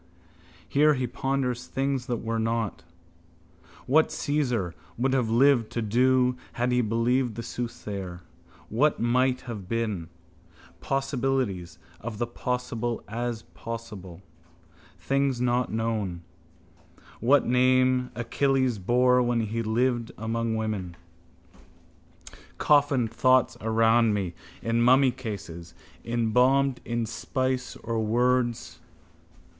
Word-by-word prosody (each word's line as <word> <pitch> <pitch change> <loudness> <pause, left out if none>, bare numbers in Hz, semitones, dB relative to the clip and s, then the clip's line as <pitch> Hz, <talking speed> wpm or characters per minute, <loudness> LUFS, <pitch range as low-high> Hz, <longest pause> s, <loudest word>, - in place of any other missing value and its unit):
Here 150 +1 +4
he 130 -1 -1
ponders 125 0 -2
things 135 -1 -2
that 120 -3 -2
were 115 0 -1
not: 115 -1 -2 1.0
what 155 +4 +4
Cæsar 125 - -1 0.2
would 130 +3 +1
have 125 -4 +1
lived 120 -1 +4
to 120 - -1
do 125 +3 +3 0.2
had 125 +1 0
he 125 0 +3
believed 115 +2 +1
the 115 - -5
soothsayer: 100 -7 -5 0.5
what 145 +7 +2
might 125 +2 +2
have 105 -6 -7
been: 110 -8 -2 0.7
possibilities 130 - -1 0.2
of 110 +2 -6
the 120 - 0
possible 120 -1 -3
as 115 0 -3
possible: 105 -6 -8 0.7
things 135 -2 0
not 125 0 +1
known: 110 -6 -2 1.0
what 135 +5 +4
name 130 0 +3
Achilles 130 0 +1
bore 125 +5 +3
when 120 -1 +1
he 110 +1 -2
lived 120 +1 0
among 115 0 -2
women. 105 -6 -3 1.6
Coffined 145 -6 +3
thoughts 130 +1 +3
around 115 0 +3
me, 95 -4 -2 0.3
in 115 +1 +1
mummycases, 115 -10 +1 0.3
embalmed 125 +3 +2
in 120 -1 -1
spice 130 +2 -2
of 115 0 -4
words. 120 +2 0
120 Hz, 105 wpm, -26 LUFS, 110-130 Hz, 1.6 s, Here